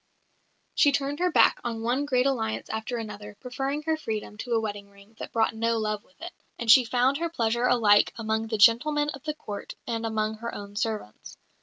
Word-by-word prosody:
She 285 - +4
turned 280 +1 -1
her 360 0 +1
back - - +4
on 225 -1 -4
one 250 +5 0
great 255 -3 +1
alliance 225 -5 -1
after 220 +2 -3
another, 210 -2 -8
preferring 270 +4 -3
her 320 +1 +1
freedom 220 -8 -5
to 245 0 -3
a 230 - +3
wedding 205 -2 -5
ring 200 +2 -20
that - - -7
brought 225 -1 +1
no 230 +1 0
love 215 -1 -2
with 275 - -30
it; 350 - -6 0.3
and 235 -2 +3
she 250 +1 +8
found 250 +4 +2
her 335 0 -1
pleasure 235 -4 0
alike 215 -5 +4
among 220 0 -1
the 220 -1 -2
gentlemen 295 +8 +4
of 275 -2 -7
the 305 -1 -2
Court 205 -9 -7
and 230 -1 -3
among 220 -1 -1
her 235 +1 -6
own 205 0 -9
servants. 215 - -4
230 Hz, 205 wpm, -26 LUFS, 220-270 Hz, 0.3 s, she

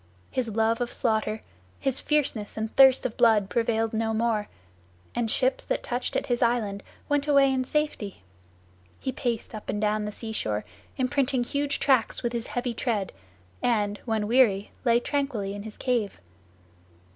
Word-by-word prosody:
His 255 -2 -1
love 225 +2 +1
of 245 - -1
slaughter, 220 -2 0 0.4
his 270 -1 +1
fierceness 260 -10 0
and 220 0 -3
thirst 265 -1 +7
of 240 - -2
blood 220 -5 +4
prevailed 225 -1 +1
no 225 0 0
more, 220 -2 0 0.6
and 235 -2 0
ships - - +1
that - - -1
touched 245 0 -3
at - - 0
his 245 -3 -1
island 225 -4 +1 0.3
went 290 0 +1
away 275 -2 +5
in 260 -1 +1
safety. 255 - -2 0.8
He 260 - -2
paced 240 -4 -3
up 215 - -8
and 205 - -1
down 210 0 +1
the 210 - -3
sea 220 +1 -6
shore, 105 - -2 0.3
imprinting 260 -1 +1
huge 280 +3 -1
tracks 260 -5 +2
with 240 0 -1
his 235 -1 -3
heavy 245 -1 -2
tread, 220 -4 -1 0.5
and, 210 -4 +1
when 220 -3 0
weary, 215 -5 +3
lay 235 -1 +4
tranquilly 245 -8 -2
in 205 - -6
his 215 0 -9
cave. 240 -6 -1
235 Hz, 165 wpm, -27 LUFS, 215-260 Hz, 0.8 s, thirst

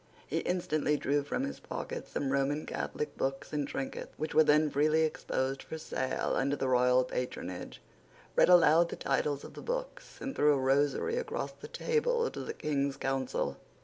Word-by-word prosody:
He - - -1
instantly 155 -4 0
drew 145 +1 +1
from 145 - -2
his 275 - -4
pocket 485 0 -5
some 135 -2 -2
Roman 140 +2 0
Catholic 150 - -4
books 135 +2 -2
and 145 -2 0
trinkets 135 - -5
which 155 - -3
were 155 - +7
then 150 0 +4
freely 155 +3 +3
exposed 135 -3 -1
for 160 - -7
sale 130 -4 -2
under 140 +2 +1
the 135 - -1
royal 125 0 +4
patronage, 125 -8 -5 0.6
read - - +5
aloud 170 -1 +6
the - - -4
titles 145 -1 0
of - - -10
the - - -9
books, - - -5
and 270 - -4
threw 150 0 +5
a - - +2
rosary 145 - +2
across 485 0 -3
the - - -11
table 470 0 0
to - - -7
the 450 - -5
King's 140 -2 -1
counsel. 135 -1 -1
150 Hz, 180 wpm, -31 LUFS, 135-170 Hz, 0.6 s, were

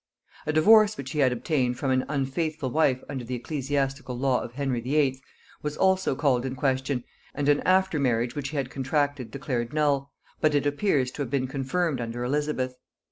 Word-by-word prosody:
A - - +2
divorce 215 +7 +6
which 135 -1 -6
he 150 - -2
had 130 -3 +4
obtained 125 0 0
from 135 +1 -1
an 130 0 +2
unfaithful 145 0 -2
wife 135 -4 +2
under 135 -3 -5
the 125 +2 -4
ecclesiastical 135 -1 -2
law 130 -1 +1
of 120 - -7
Henry 135 -3 -1
VIII. 135 +1 +1 0.4
was 150 0 -4
also 190 -6 +2
called 130 -3 +2
in 130 -1 -3
question, 130 -1 0 0.3
and 145 0 -1
an 145 0 +4
after 190 -3 +3
marriage 120 -3 +1
which 140 -2 -3
he 150 - -5
had 135 -2 -2
contracted 140 -1 -1
declared 130 -3 -3
null, 145 -2 +1 0.3
but 155 -1 +2
it 145 - +2
appears 145 -3 +1
to 145 - -6
have 135 - -2
been 130 0 0
confirmed 135 +2 -1
under 120 +1 -4
Elizabeth. 135 -1 -1
135 Hz, 190 wpm, -26 LUFS, 130-150 Hz, 0.4 s, divorce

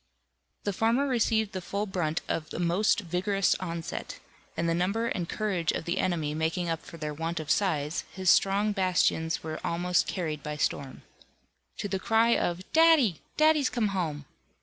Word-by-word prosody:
The 205 - -1
farmer 230 +7 +2
received 225 -4 +1
the 185 - -4
full 200 +3 -3
brunt 175 -5 -2
of 155 - -3
a - - -3
most 175 +6 +2
vigorous 190 +2 +1
onset, 170 -3 -5 0.4
and 170 - 0
the 165 - +2
number 195 +7 0
and 175 -6 -3
courage 190 -6 0
of - - -4
the 170 - -1
enemy 160 -5 0
making 165 +3 -1
up 165 -1 -2
for 175 -2 -11
their 150 -1 -4
want 165 +2 -3
of 150 -2 -3
size, 155 -5 0
his 185 -2 +3
strong 200 +2 +3
bastions 180 -4 +1
were 155 0 -5
almost 175 +1 +1
carried 155 -5 -3
by 150 +1 -5
storm. 140 -2 -2 0.7
To - - -3
the 195 -1 -2
cry 225 +3 +3
of 175 +1 -1
"Daddy! 320 - +5 0.2
Daddy's 305 -3 +4
come 225 -4 0
home!" 160 -7 -3
180 Hz, 170 wpm, -28 LUFS, 165-205 Hz, 0.7 s, Daddy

